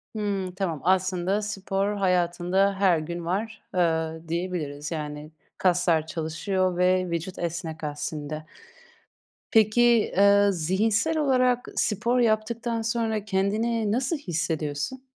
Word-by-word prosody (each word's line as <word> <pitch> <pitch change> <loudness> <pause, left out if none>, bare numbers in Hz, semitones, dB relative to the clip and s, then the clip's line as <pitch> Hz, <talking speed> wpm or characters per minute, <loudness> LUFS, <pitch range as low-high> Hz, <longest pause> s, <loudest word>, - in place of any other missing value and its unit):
Hımm. 200 -3 -2
Tamam, 175 -7 -2
aslında, 185 +2 +1
spor 200 0 -2
hayatında 180 +1 +1
her 185 -5 +4
gün 170 +2 -5
var, 210 +5 -3
ııı, 160 -2 0
diyebiliriz. 160 -4 -3
Yani, 150 -1 -5 0.3
kaslar 175 -3 +2
çalışıyor 175 +3 -1
ve 185 0 +2
vücut 170 +2 -4
esnek 165 -2 -4
aslında. 150 +1 -4 1.1
Peki, 220 +1 +4 0.3
eee, 200 +1 +5
zihinsel 210 - +1
olarak 255 -4 +2
spor 230 +3 +1
yaptıktan 230 +1 0
sonra 225 -2 -1
kendini 210 +2 0
nasıl 260 +7 0
hissediyorsun? 160 - -3
185 Hz, 105 wpm, -26 LUFS, 165-215 Hz, 1.1 s, eee